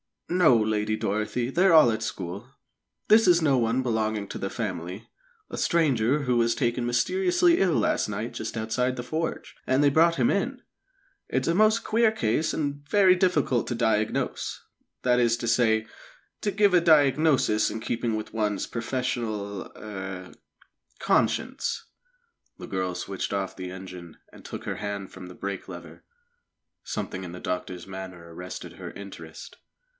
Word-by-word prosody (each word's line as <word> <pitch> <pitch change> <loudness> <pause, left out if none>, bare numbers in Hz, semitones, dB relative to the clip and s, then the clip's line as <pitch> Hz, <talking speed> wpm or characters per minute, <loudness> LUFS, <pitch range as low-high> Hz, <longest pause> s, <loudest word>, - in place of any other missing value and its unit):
"No, 175 -7 +5
Lady 110 -1 0
Dorothy; 110 +3 -1
they're 180 +4 +4
all 155 -7 +7
at 110 - -3
school. 100 +1 -5 0.6
This 220 -1 +6
is 175 -1 +5
no 140 -4 +3
one 120 +2 +1
belonging 110 -3 -1
to - - -5
the 95 - -3
family 95 -2 -5 0.4
a - - -6
stranger 145 -4 +2
who 125 -2 +1
was 115 0 +2
taken 120 -2 0
mysteriously 355 - +2
ill 180 -3 +3
last - - +1
night 105 +3 -4
just 110 +1 -5
outside 120 +3 -1
the 120 - -5
forge, 160 +5 -4
and 130 +2 +3
they 145 - +6
brought 165 +3 +4
him 125 -5 +2
in. 245 +6 -1 0.7
It's - - 0
a - - +3
most 215 +4 +4
queer 225 0 +3
case, 150 - 0
and 145 -2 -3
very 195 -3 +6
difficult 175 -9 +1
to 120 - -2
diagnose 110 -2 -1 0.4
that 125 -1 +3
is 120 -1 +3
to 120 - -4
say, 110 -2 +3 0.5
to 210 - -1
give 205 0 +3
a 180 - +6
diagnosis 150 -7 +4
in 110 - -5
keeping 115 -1 -1
with 110 0 -5
one's 105 -3 -1
professional 110 -4 -3
er 95 -3 -7 0.7
conscience." - - 0 0.7
The - - -9
girl 95 -2 -2
switched 95 +2 -4
off 95 -1 -2
the 90 -1 -6
engine, 90 -2 -9
and - - -15
took - - -7
her - - -4
hand 100 -2 -5
from 95 -1 -10
the 90 - -11
brake 100 -1 -5
lever. 85 -2 -10 0.8
Something 95 - -4
in 85 - -8
the 90 - -7
doctor's 90 0 -4
manner 95 -3 -9
arrested 90 +2 -8
her - - -8
interest. 85 -5 -10
115 Hz, 160 wpm, -26 LUFS, 100-150 Hz, 0.8 s, all